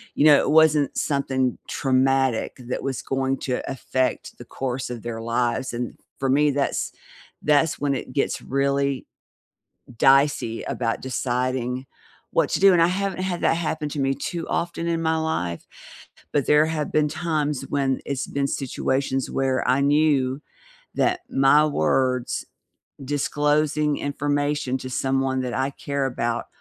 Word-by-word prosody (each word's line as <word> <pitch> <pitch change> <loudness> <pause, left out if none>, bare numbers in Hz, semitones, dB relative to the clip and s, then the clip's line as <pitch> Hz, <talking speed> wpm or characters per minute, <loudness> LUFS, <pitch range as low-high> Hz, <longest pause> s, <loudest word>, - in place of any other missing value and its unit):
you 150 - +3
know, 145 -2 +8
it - - 0
wasn't 155 -3 +4
something 130 -3 0
traumatic 135 -2 +1
that - - -3
was 135 -3 -2
going 135 0 -1
to 125 -2 -2
affect 130 0 -2
the - - -11
course 130 -1 -4
of 120 -3 -6
their 115 -1 -5
lives, 120 +2 -1
and 120 0 -4 0.2
for 135 -1 0
me, 145 +2 +4
that's 140 0 -1 0.5
that's 150 +1 +2
when 140 -1 0
it 130 - -6
gets 140 - -1
really 140 0 0 0.9
dicey 135 -4 +3
about 115 -2 -2
deciding 125 0 -2 0.5
what - - +2
to - - +1
do, 195 0 +7
and 170 - +4
I - - +5
haven't 190 0 -2
had 180 -2 -2
that - - +3
happen 155 -2 -2
to 145 - -5
me 135 0 +1
too 165 +3 -4
often 170 0 -2
in 165 -1 0
my 160 0 +1
life, 90 - -2 0.7
but 145 -2 +2
there 150 +1 +5
have 155 -2 -2
been 150 -1 +3
times 150 -4 -1
when 135 -2 0
it's 140 -1 -3
been 140 0 -1
situations 135 0 -1
where 130 -1 0
I 130 +2 +3
knew 140 -2 +2 0.5
that 365 0 +1
my 145 +3 +5
words 125 - 0 0.6
disclosing 150 +1 +1
information 145 -1 -1
to 130 - -7
someone 135 0 0
that 125 -1 -3
I 135 +1 0
care 140 -1 -2
about 120 -2 -2
140 Hz, 150 wpm, -24 LUFS, 130-150 Hz, 0.9 s, know